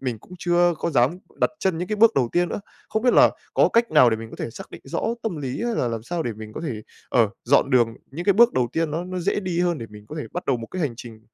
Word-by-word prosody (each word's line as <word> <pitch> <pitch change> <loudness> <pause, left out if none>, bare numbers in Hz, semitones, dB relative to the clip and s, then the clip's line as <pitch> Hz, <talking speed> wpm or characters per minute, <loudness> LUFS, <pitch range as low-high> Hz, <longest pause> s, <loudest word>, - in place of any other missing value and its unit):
mình 125 -4 -3
cũng 180 - -18
chưa 175 0 +3
có - - -1
dám 135 +4 +2 0.2
đặt - - +3
chân 185 -4 0
những 180 +1 -3
cái 215 - -1
bước 225 +1 +5
đầu 125 -3 +2
tiên 175 0 +2
nữa. - - -4 0.3
Không 220 - -1
biết 245 -1 +4
là - - +7 0.2
có - - +5
cách 230 0 +3
nào 140 -6 +6
để 110 - +1
mình 115 0 -9
có - - -10
thể - - -4
xác - - -10
định - - -10
rõ 135 - -3 0.2
tâm 200 -8 -2
lý 135 - -4
hay 235 -1 -1
là 125 - 0
làm 115 -1 -4
sao 170 +7 -3
để 120 - -3
mình 110 0 -10
có 155 - -6
thể, 120 -10 -4 0.3
ờ, 115 -3 +3 0.2
dọn 140 +2 +3
đường 120 -3 +3 0.2
những 170 +6 -6
cái 200 - +5
bước 235 +4 +5
đầu 125 -2 +1
tiên 165 -1 0
nó 165 +4 -3
nó 185 0 -5
dễ 195 +3 0
đi 180 -3 -2
hơn 175 -2 +1
để 115 - -6
mình 105 0 -12
có 155 - -7
thể 150 - -4
bắt 180 - -4
đầu 130 - +2
một 115 - -7
cái 185 - -6
hành 130 -6 -1
trình, 115 -3 -10
155 Hz, 310 wpm, -23 LUFS, 120-180 Hz, 0.3 s, là